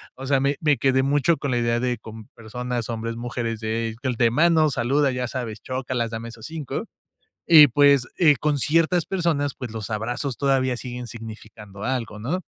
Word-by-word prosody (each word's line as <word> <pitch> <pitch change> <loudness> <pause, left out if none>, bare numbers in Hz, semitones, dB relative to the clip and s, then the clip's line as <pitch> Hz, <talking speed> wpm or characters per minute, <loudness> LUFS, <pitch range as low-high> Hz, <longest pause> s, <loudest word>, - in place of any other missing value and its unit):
O 135 - -8
sea, 135 0 +2
me 140 +1 0
me 150 -3 +2
quedé 130 -1 +2
mucho 145 +4 +2
con 140 - -3
la 120 - +1
idea 120 0 +1
de 125 0 -1
con 110 0 -11
personas, 120 +1 -4
hombres, 115 0 -4
mujeres 120 -1 -4
de 115 0 -2 0.2
de 115 -1 +3
manos, 155 +1 +3
saluda, 135 +4 +1
ya 125 -1 -2
sabes, 120 -4 -5
chócalas, 130 -2 -3
dame 115 0 -5
esos 115 -1 -11
5, 160 -4 -5 0.6
y 155 -3 +9
pues, 140 0 +4
eh, 150 -5 +5
con 150 +2 0
ciertas 165 +4 +2
personas, 160 -7 0
pues, 125 -4 -7
los 110 -2 -6
abrazos 120 +4 -3
todavía 135 -2 +1
siguen 125 0 -7
significando 110 -3 -10
algo, 120 -5 -3
¿no? 165 - -2
125 Hz, 180 wpm, -23 LUFS, 115-145 Hz, 0.6 s, y